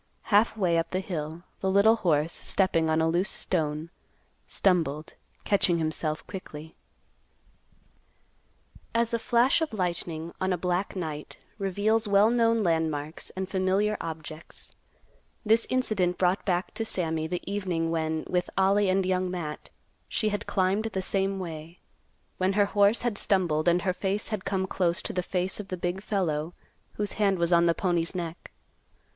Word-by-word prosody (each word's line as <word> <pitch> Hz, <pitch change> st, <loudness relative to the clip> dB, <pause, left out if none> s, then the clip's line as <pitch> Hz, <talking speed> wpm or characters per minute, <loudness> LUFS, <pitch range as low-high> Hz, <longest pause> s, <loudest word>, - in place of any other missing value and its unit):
Half 215 Hz, +2 st, +4 dB
way 175 Hz, -5 st, +2 dB
up 165 Hz, 0 st, -2 dB
the 185 Hz, -, -1 dB
hill, 165 Hz, -3 st, -5 dB, 0.2 s
the 190 Hz, -, 0 dB
little 200 Hz, +4 st, +5 dB
horse, 160 Hz, -5 st, +1 dB
stepping 165 Hz, -4 st, +1 dB
on 160 Hz, 0 st, +2 dB
a 160 Hz, -, +3 dB
loose 175 Hz, +5 st, +1 dB
stone, 155 Hz, -2 st, -1 dB, 0.6 s
stumbled, 160 Hz, -5 st, +1 dB, 0.3 s
catching 190 Hz, -4 st, +3 dB
himself 155 Hz, -1 st, -1 dB
quickly. 160 Hz, -5 st, -9 dB, 2.2 s
As 235 Hz, 0 st, +2 dB
a 230 Hz, -, +1 dB
flash 240 Hz, +7 st, +3 dB
of 320 Hz, -7 st, -2 dB
lightning 170 Hz, -4 st, -3 dB
on 185 Hz, 0 st, +1 dB
a 180 Hz, -, +1 dB
black 180 Hz, +3 st, -1 dB
night 155 Hz, -5 st, -5 dB, 0.2 s
reveals 205 Hz, +3 st, +1 dB
well 205 Hz, +2 st, +5 dB
known 230 Hz, -2 st, +3 dB
landmarks 160 Hz, -3 st, -1 dB
and 190 Hz, 0 st, -3 dB
familiar 195 Hz, +3 st, +1 dB
objects, 160 Hz, -1 st, -7 dB, 0.7 s
this 225 Hz, +2 st, +3 dB
incident 205 Hz, -8 st, +1 dB
brought 180 Hz, +1 st, +1 dB
back 180 Hz, -1 st, 0 dB
to 225 Hz, -, -2 dB
Sammy 160 Hz, -6 st, -1 dB
the 180 Hz, +1 st, -3 dB
evening 180 Hz, -5 st, -1 dB
when, 160 Hz, -1 st, -1 dB
with 180 Hz, -1 st, 0 dB
Ollie 195 Hz, +1 st, +3 dB
and 190 Hz, 0 st, +2 dB
Young 185 Hz, 0 st, 0 dB
Matt, 165 Hz, -4 st, -5 dB, 0.4 s
she 215 Hz, -, 0 dB
had 205 Hz, 0 st, -3 dB
climbed 195 Hz, +3 st, +1 dB
the 195 Hz, -4 st, -2 dB
same 195 Hz, +1 st, 0 dB
way; 165 Hz, -2 st, -7 dB, 0.6 s
when 185 Hz, +1 st, +2 dB
her 205 Hz, 0 st, +4 dB
horse 205 Hz, +2 st, +3 dB
had 235 Hz, -4 st, 0 dB
stumbled 170 Hz, -6 st, +1 dB
and 175 Hz, +1 st, +3 dB
her 185 Hz, -, +1 dB
face 200 Hz, +2 st, -2 dB
had 215 Hz, -4 st, -4 dB
come 190 Hz, -1 st, 0 dB
close 180 Hz, -2 st, 0 dB
to -, -, -3 dB
the 180 Hz, -, 0 dB
face 180 Hz, +2 st, -2 dB
of 205 Hz, -, -6 dB
the 185 Hz, -, -4 dB
big 175 Hz, +2 st, -2 dB
fellow 170 Hz, -6 st, -1 dB, 0.4 s
whose 210 Hz, -1 st, -2 dB
hand 195 Hz, -2 st, +3 dB
was 170 Hz, 0 st, +1 dB
on 170 Hz, 0 st, +5 dB
the 170 Hz, -, +3 dB
pony's 175 Hz, -1 st, 0 dB
neck. 170 Hz, -1 st, -5 dB
185 Hz, 160 wpm, -27 LUFS, 165-200 Hz, 2.2 s, little